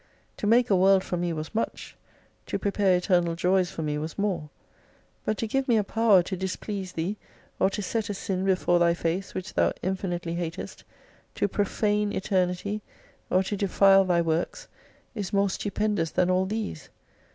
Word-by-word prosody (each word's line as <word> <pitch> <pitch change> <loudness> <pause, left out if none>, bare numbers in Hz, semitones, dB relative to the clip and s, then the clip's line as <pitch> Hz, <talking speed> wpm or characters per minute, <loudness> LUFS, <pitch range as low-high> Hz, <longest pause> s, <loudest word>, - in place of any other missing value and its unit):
To 205 - -2
make 235 +1 +4
a - - +6
world 190 +1 +5
for - - -3
me 175 0 -1
was 155 +2 -5
much, 225 - -3 0.5
to - - -1
prepare 200 -2 +2
eternal 175 -2 +1
joys 180 +1 +2
for 160 - -5
me 150 -1 -1
was 155 +2 -5
more. 185 -7 -1 0.8
But 215 - 0
to 225 - -2
give 270 +4 -1
me 235 -3 +4
a 210 - +2
power 210 -3 +4
to 190 - -4
displease 190 +1 -4
thee, 180 +6 -2 0.4
or 190 - +4
to 205 - -4
set 220 +1 -2
a 205 - -2
sin 190 -1 -2
before 185 -2 +2
Thy 170 0 +3
face, 170 +3 -2
which 185 +2 -5
Thou - - +2
infinitely 175 -2 -2
hatest, 170 -1 -5 0.5
to - - +1
profane 205 +1 0
Eternity, 190 +2 -1 0.5
or 185 +1 +3
to 205 - -3
defile 195 0 +5
Thy 175 -2 +2
works, 165 +1 -2 0.5
is 205 -5 -5
more 200 -1 +2
stupendous 205 -4 -1
than 180 +2 +1
all 185 +1 +2
these. 210 -7 -4
190 Hz, 175 wpm, -26 LUFS, 175-205 Hz, 0.8 s, a